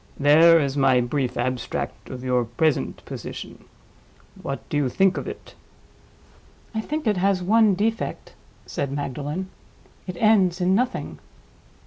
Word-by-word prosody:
There 160 +4 +7
is 140 -2 -1
my 135 -3 +4
brief 125 +1 -1
abstract 125 +1 -3
of 125 -1 -7
your 125 -1 +1
present 135 +7 -1
position. - - -8 0.8
What 140 - -5
do - - -4
you 140 -3 +1
think 190 +7 +3
of - - -4
it?" 425 +1 -9 1.2
"I 220 - -1
think 305 +6 -4
it 210 -3 +2
has 190 0 +1
one 215 +1 +4
defect," 225 +4 -2 0.3
said 140 -1 -3
Magdalen. 145 +6 -4 0.6
"It 180 -1 -5
ends 195 -4 +3
in 180 +1 +2
nothing." 250 +5 -1
165 Hz, 135 wpm, -24 LUFS, 135-195 Hz, 1.2 s, There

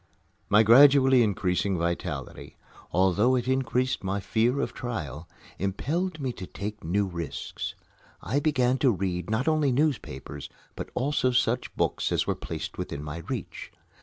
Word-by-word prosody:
My 105 +2 +6
gradually 130 +2 +7
increasing 95 -2 +1
vitality, 85 +1 -4 0.3
although 95 +8 +3
it 125 -1 -1
increased 130 -2 0
my 95 +1 -1
fear 110 +7 +1
of - - -2
trial, 85 - -5 0.3
impelled 155 - -2
me 130 -3 -2
to 90 - -8
take 105 +1 -6
new 100 +5 +1
risks. 85 -6 -5 0.4
I 140 - -1
began 130 -4 +2
to 135 - +4
read 90 -4 -2
not 110 +6 0
only 155 -3 +3
newspapers, 120 - -2 0.3
but - - -6
also 135 0 +1
such 125 0 0
books - - 0
as - - +1
were - - +1
placed - - -6
within 70 - -4
my 75 +1 -5
reach. - - -5
115 Hz, 145 wpm, -27 LUFS, 95-130 Hz, 0.4 s, gradually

